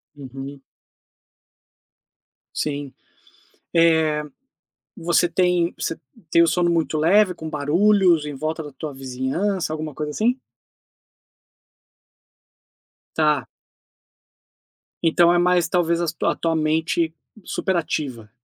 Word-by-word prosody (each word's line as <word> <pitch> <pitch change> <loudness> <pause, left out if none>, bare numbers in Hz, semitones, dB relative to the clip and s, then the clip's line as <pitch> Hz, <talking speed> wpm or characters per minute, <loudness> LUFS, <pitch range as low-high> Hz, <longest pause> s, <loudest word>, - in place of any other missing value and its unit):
Uhum. 135 0 -9 1.9
Sim. 145 -2 -3 0.8
Eh, 160 -2 +3 0.7
você 175 +1 +2
tem 180 -1 +1
você 165 - -3 0.3
tem 170 - +5
o - - +3
sono 175 +1 +2
muito 165 -2 0
leve, 185 +5 +4
com 160 -2 -7
barulhos 170 +3 +3
em 150 - -5
volta 155 +3 -3
da 145 - -9
tua 145 +2 -7
vizinhança, 135 +8 -2
alguma 155 -1 -5
coisa 150 +1 -4
assim? 240 - 0 2.8
Tá. 150 -4 +2 1.6
Então 170 +1 +4
é 175 - +3
mais 175 -1 +3
talvez 170 -1 +1
a 170 - -1
su 155 - -4
a - - +2
tua 165 -1 -1
mente 160 +1 0 0.3
superativa. 150 - -2
160 Hz, 105 wpm, -22 LUFS, 150-175 Hz, 2.8 s, tem